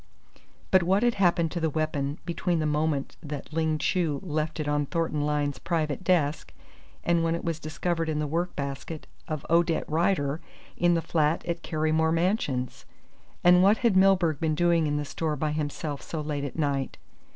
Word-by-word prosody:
But 185 Hz, -, +6 dB
what 190 Hz, +5 st, +2 dB
had 240 Hz, -1 st, +3 dB
happened 175 Hz, -5 st, +2 dB
to 175 Hz, -, -3 dB
the 160 Hz, -1 st, +1 dB
weapon 150 Hz, -2 st, -2 dB
between 175 Hz, 0 st, -1 dB
the 155 Hz, -, 0 dB
moment 150 Hz, -2 st, -1 dB
that 150 Hz, 0 st, -7 dB
Ling 160 Hz, -1 st, +1 dB
Chu 155 Hz, -3 st, 0 dB
left 155 Hz, -2 st, -2 dB
it 150 Hz, -, -2 dB
on 145 Hz, -1 st, 0 dB
Thornton 165 Hz, -2 st, -1 dB
Lyne's 145 Hz, -2 st, -1 dB
private 160 Hz, -1 st, -1 dB
desk 160 Hz, -5 st, +1 dB, 0.5 s
and 170 Hz, -1 st, +2 dB
when 165 Hz, 0 st, +1 dB
it 170 Hz, -, -5 dB
was 165 Hz, -1 st, -2 dB
discovered 165 Hz, +1 st, -2 dB
in 155 Hz, -, -1 dB
the 150 Hz, -, 0 dB
work 170 Hz, +4 st, -2 dB
basket 140 Hz, +3 st, -5 dB, 0.2 s
of 155 Hz, -3 st, -4 dB
Odette 170 Hz, 0 st, +2 dB
Rider 155 Hz, -2 st, +1 dB, 0.3 s
in 175 Hz, 0 st, +3 dB
the 165 Hz, -, 0 dB
flat 155 Hz, 0 st, +1 dB
at 170 Hz, -1 st, -3 dB
Carrymore 155 Hz, 0 st, +1 dB
Mansions? 165 Hz, -, 0 dB, 0.6 s
And 180 Hz, 0 st, +7 dB
what 200 Hz, +3 st, +5 dB
had 225 Hz, -5 st, +4 dB
Milburgh 185 Hz, -5 st, +4 dB
been 160 Hz, -2 st, 0 dB
doing 170 Hz, -1 st, +3 dB
in 145 Hz, 0 st, 0 dB
the 145 Hz, -, -2 dB
store 155 Hz, +1 st, -2 dB
by 150 Hz, +1 st, -1 dB
himself 150 Hz, -1 st, -3 dB
so 160 Hz, -, -5 dB
late 150 Hz, -2 st, -3 dB
at 140 Hz, -, -6 dB
night? 140 Hz, -3 st, -1 dB
160 Hz, 185 wpm, -27 LUFS, 150-170 Hz, 0.6 s, And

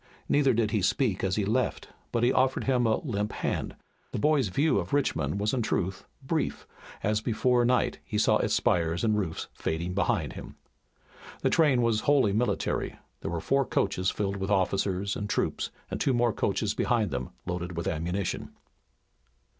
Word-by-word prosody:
Neither 135 Hz, -4 st, +3 dB
did 110 Hz, -2 st, +1 dB
he 110 Hz, -3 st, +1 dB
speak 100 Hz, +1 st, +1 dB
when 95 Hz, -, 0 dB
he 105 Hz, 0 st, +1 dB
left, 120 Hz, +4 st, -1 dB, 0.2 s
but 115 Hz, -, 0 dB
he 125 Hz, -, +4 dB
offered 130 Hz, 0 st, +2 dB
him 125 Hz, -3 st, +2 dB
a 110 Hz, -, +3 dB
limp 105 Hz, -7 st, -2 dB
hand. -, -, -2 dB, 0.4 s
The -, -, -3 dB
boy's 145 Hz, 0 st, +3 dB
view 140 Hz, -, +2 dB
of 90 Hz, +5 st, -5 dB
Richmond 140 Hz, -7 st, 0 dB
was 105 Hz, +2 st, 0 dB
in 130 Hz, -, +1 dB
truth 95 Hz, -3 st, -1 dB, 0.2 s
brief, 155 Hz, +3 st, -2 dB, 0.4 s
as 105 Hz, +1 st, +1 dB
before 120 Hz, +2 st, +2 dB
night 125 Hz, +1 st, +1 dB
he 105 Hz, -, -3 dB
saw 105 Hz, -, +4 dB
its -, -, +1 dB
spires 85 Hz, +1 st, +1 dB
and 110 Hz, -2 st, +3 dB
roofs 95 Hz, -6 st, -2 dB
fading 85 Hz, +3 st, -3 dB
behind 100 Hz, -, 0 dB
him. -, -, -9 dB, 0.9 s
The -, -, +3 dB
train 140 Hz, -7 st, +4 dB
was 115 Hz, -2 st, +2 dB
wholly 135 Hz, -6 st, +3 dB
military. 120 Hz, +4 st, 0 dB, 0.2 s
There 80 Hz, -, -4 dB
were 85 Hz, 0 st, -2 dB
four 135 Hz, +10 st, +2 dB
coaches 95 Hz, -6 st, 0 dB
filled 100 Hz, -1 st, -2 dB
with 95 Hz, 0 st, -3 dB
officers 100 Hz, 0 st, +1 dB
and 105 Hz, 0 st, -4 dB
troops, -, -, -1 dB, 0.2 s
and -, -, -3 dB
two 135 Hz, -, +2 dB
more 120 Hz, -2 st, +2 dB
coaches -, -, 0 dB
behind 110 Hz, -5 st, +1 dB
them 65 Hz, 0 st, -3 dB, 0.2 s
loaded 90 Hz, -1 st, -4 dB
with 85 Hz, -, -2 dB
ammunition. 90 Hz, +5 st, -2 dB
105 Hz, 180 wpm, -28 LUFS, 95-125 Hz, 0.9 s, he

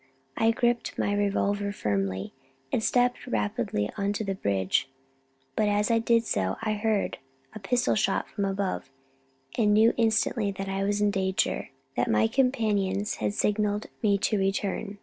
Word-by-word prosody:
I 225 Hz, -, +3 dB
gripped 240 Hz, +1 st, 0 dB
my 205 Hz, -, 0 dB
revolver 205 Hz, 0 st, 0 dB
firmly, 95 Hz, -, -2 dB, 0.4 s
and 220 Hz, -, 0 dB
stepped 245 Hz, +1 st, +1 dB
rapidly 105 Hz, -1 st, -1 dB
on 200 Hz, +1 st, 0 dB
to 205 Hz, -, -2 dB
the 195 Hz, -2 st, -2 dB
bridge; 100 Hz, -, 0 dB, 0.7 s
but 210 Hz, -, +2 dB
as 205 Hz, +2 st, +1 dB
I 230 Hz, -, +4 dB
did 230 Hz, 0 st, +2 dB
so 95 Hz, -, 0 dB
I 215 Hz, -1 st, +1 dB
heard 210 Hz, -1 st, 0 dB, 0.3 s
a -, -, -7 dB
pistol 245 Hz, +5 st, +1 dB
shot 195 Hz, -2 st, +1 dB
from 200 Hz, -, -3 dB
above, 195 Hz, -6 st, -2 dB, 0.7 s
and 210 Hz, -2 st, +4 dB
knew 220 Hz, +2 st, +5 dB
instantly 225 Hz, -2 st, +2 dB
that 195 Hz, 0 st, -5 dB
I 195 Hz, 0 st, -1 dB
was 205 Hz, +1 st, 0 dB
in 205 Hz, 0 st, +3 dB
danger 190 Hz, -1 st, 0 dB, 0.3 s
that 120 Hz, -, 0 dB
my 110 Hz, 0 st, +4 dB
companions 210 Hz, -, +1 dB
had 105 Hz, -1 st, -2 dB
signalled 210 Hz, 0 st, 0 dB, 0.2 s
me 205 Hz, -3 st, +3 dB
to 210 Hz, +1 st, 0 dB
return. 195 Hz, +1 st, -1 dB
205 Hz, 160 wpm, -27 LUFS, 195-220 Hz, 0.7 s, knew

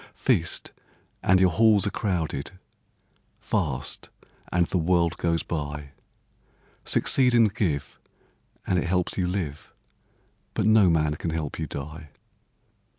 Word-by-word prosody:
Feast, -, -, 0 dB, 0.5 s
and 95 Hz, 0 st, +4 dB
your 95 Hz, -1 st, +4 dB
halls 105 Hz, +2 st, +4 dB
are 100 Hz, -, -1 dB
crowded; 85 Hz, -9 st, -2 dB, 0.9 s
Fast, -, -, -3 dB, 0.4 s
and 85 Hz, 0 st, +3 dB
the 90 Hz, -, -1 dB
world 85 Hz, 0 st, +2 dB
goes 85 Hz, -1 st, 0 dB
by. 75 Hz, -3 st, -5 dB, 0.9 s
Succeed 125 Hz, -2 st, +3 dB
and 115 Hz, -4 st, +4 dB
give, 85 Hz, -, -2 dB, 0.7 s
and 90 Hz, -, +1 dB
it 85 Hz, -, -2 dB
helps 90 Hz, 0 st, 0 dB
you 90 Hz, -2 st, 0 dB
live, 85 Hz, -6 st, -4 dB, 0.8 s
But -, -, 0 dB
no 110 Hz, -3 st, +5 dB
man 75 Hz, -2 st, +2 dB
can 85 Hz, -, -3 dB
help 80 Hz, -2 st, -4 dB
you 80 Hz, -, -2 dB
die. 75 Hz, +3 st, -7 dB
85 Hz, 125 wpm, -26 LUFS, 75-95 Hz, 0.9 s, no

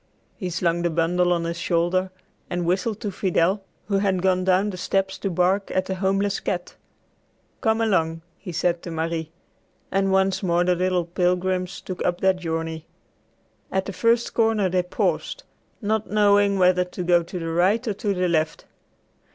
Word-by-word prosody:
He 185 Hz, -4 st, -4 dB
slung 170 Hz, -1 st, 0 dB
the 175 Hz, -, +1 dB
bundle 175 Hz, +2 st, +1 dB
on 170 Hz, -1 st, +1 dB
his 170 Hz, 0 st, -3 dB
shoulder 175 Hz, +2 st, +1 dB, 0.4 s
and 175 Hz, -1 st, -2 dB
whistled 190 Hz, +5 st, 0 dB
to 210 Hz, -4 st, -3 dB
Fidel, 185 Hz, +1 st, +1 dB, 0.2 s
who 200 Hz, -1 st, +1 dB
had 190 Hz, -2 st, 0 dB
gone 185 Hz, -1 st, +2 dB
down 190 Hz, +2 st, +2 dB
the 185 Hz, -, -7 dB
steps 195 Hz, +1 st, 0 dB
to 195 Hz, -, -2 dB
bark 185 Hz, +3 st, +1 dB
at 185 Hz, 0 st, 0 dB
a -, -, +1 dB
homeless 195 Hz, +1 st, 0 dB
cat. 175 Hz, -1 st, -4 dB, 0.9 s
"Come 220 Hz, -1 st, +2 dB
along," 165 Hz, -7 st, +1 dB, 0.2 s
he 185 Hz, -, -7 dB
said 170 Hz, +1 st, 0 dB
to -, -, -7 dB
Marie. 165 Hz, -1 st, -3 dB, 0.6 s
And 195 Hz, 0 st, +1 dB
once 190 Hz, 0 st, +2 dB
more 175 Hz, -2 st, +2 dB
the 180 Hz, 0 st, +3 dB
little 180 Hz, 0 st, 0 dB
pilgrims 180 Hz, +1 st, -1 dB
took 185 Hz, -, -5 dB
up 175 Hz, 0 st, 0 dB
their 190 Hz, 0 st, +4 dB
journey. 165 Hz, -2 st, -4 dB, 0.8 s
At 190 Hz, 0 st, 0 dB
the 200 Hz, -, -5 dB
first 230 Hz, +6 st, +1 dB
corner 220 Hz, -4 st, +2 dB
they 180 Hz, 0 st, +2 dB
paused, 180 Hz, -, -2 dB, 0.4 s
not 215 Hz, +1 st, 0 dB
knowing 205 Hz, -1 st, +4 dB
whether 180 Hz, -1 st, +4 dB
to 180 Hz, 0 st, -6 dB
go 175 Hz, 0 st, +4 dB
to 170 Hz, +2 st, -7 dB
the 165 Hz, -1 st, -4 dB
right 195 Hz, +8 st, +2 dB
or 215 Hz, -, +1 dB
to 205 Hz, 0 st, -1 dB
the 180 Hz, 0 st, +1 dB
left. 160 Hz, -2 st, 0 dB
185 Hz, 175 wpm, -24 LUFS, 175-195 Hz, 0.9 s, their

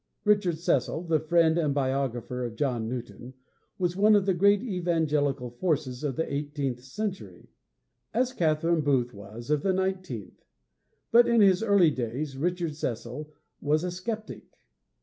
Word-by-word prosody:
Richard 200 Hz, -5 st, +3 dB
Cecil 160 Hz, 0 st, 0 dB
the 165 Hz, -2 st, +1 dB
friend 165 Hz, +1 st, +3 dB
and 150 Hz, -4 st, 0 dB
biographer 130 Hz, -2 st, -1 dB
of 120 Hz, -2 st, -5 dB
John 120 Hz, -4 st, -1 dB
Newton 125 Hz, +1 st, -7 dB, 0.4 s
was 180 Hz, -2 st, -1 dB
one 210 Hz, +2 st, +5 dB
of 200 Hz, -2 st, +3 dB
the 195 Hz, -, +2 dB
great 200 Hz, +4 st, +4 dB
evangelical 155 Hz, -, 0 dB
forces 140 Hz, -2 st, -2 dB
of 140 Hz, -4 st, -1 dB
the 160 Hz, -, -2 dB
eighteenth 140 Hz, -3 st, -3 dB
century, 195 Hz, +9 st, -6 dB, 0.6 s
as 250 Hz, +3 st, 0 dB
Catherine 165 Hz, -2 st, +1 dB
Booth 130 Hz, -4 st, +1 dB
was 110 Hz, +6 st, -9 dB
of 150 Hz, -1 st, +2 dB
the 190 Hz, +2 st, +1 dB
nineteenth. 185 Hz, -, -3 dB, 0.7 s
But, 235 Hz, +1 st, +6 dB
in 235 Hz, -1 st, +4 dB
his 195 Hz, -1 st, +5 dB
early 200 Hz, -7 st, +4 dB
days, 130 Hz, +3 st, -4 dB
Richard 170 Hz, +2 st, -1 dB
Cecil 130 Hz, +2 st, -5 dB, 0.3 s
was 150 Hz, +3 st, +1 dB
a 180 Hz, -, -2 dB
skeptic. 215 Hz, +4 st, -6 dB
155 Hz, 150 wpm, -27 LUFS, 130-185 Hz, 0.7 s, But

